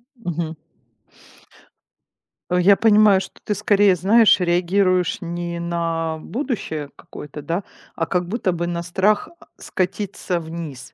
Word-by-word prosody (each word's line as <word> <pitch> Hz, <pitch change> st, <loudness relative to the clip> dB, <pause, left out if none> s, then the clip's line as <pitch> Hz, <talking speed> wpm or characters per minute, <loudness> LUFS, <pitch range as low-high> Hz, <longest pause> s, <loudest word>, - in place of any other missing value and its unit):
М, 180 Hz, -8 st, -5 dB
мгм. 160 Hz, 0 st, -3 dB, 1.9 s
Э, 180 Hz, 0 st, +2 dB
я 200 Hz, +3 st, +6 dB
понимаю, 210 Hz, -2 st, +5 dB
что -, -, -10 dB
ты 210 Hz, -, -1 dB
скорее, 205 Hz, -2 st, +3 dB
знаешь, 210 Hz, +5 st, +5 dB
реагируешь 180 Hz, +1 st, +1 dB
не 170 Hz, 0 st, -4 dB
на 165 Hz, -1 st, -2 dB
будущее 180 Hz, -, -4 dB
какое-то, 150 Hz, 0 st, -10 dB
да? 170 Hz, +6 st, -2 dB, 0.3 s
А 165 Hz, -, -1 dB
как 180 Hz, 0 st, -1 dB
будто 200 Hz, -2 st, -1 dB
бы 175 Hz, 0 st, -2 dB
на 170 Hz, 0 st, -3 dB
страх, 195 Hz, -, +1 dB
а, -, -, -17 dB
скатиться 185 Hz, -1 st, -2 dB
вниз. 160 Hz, -5 st, -8 dB
180 Hz, 130 wpm, -21 LUFS, 170-200 Hz, 1.9 s, я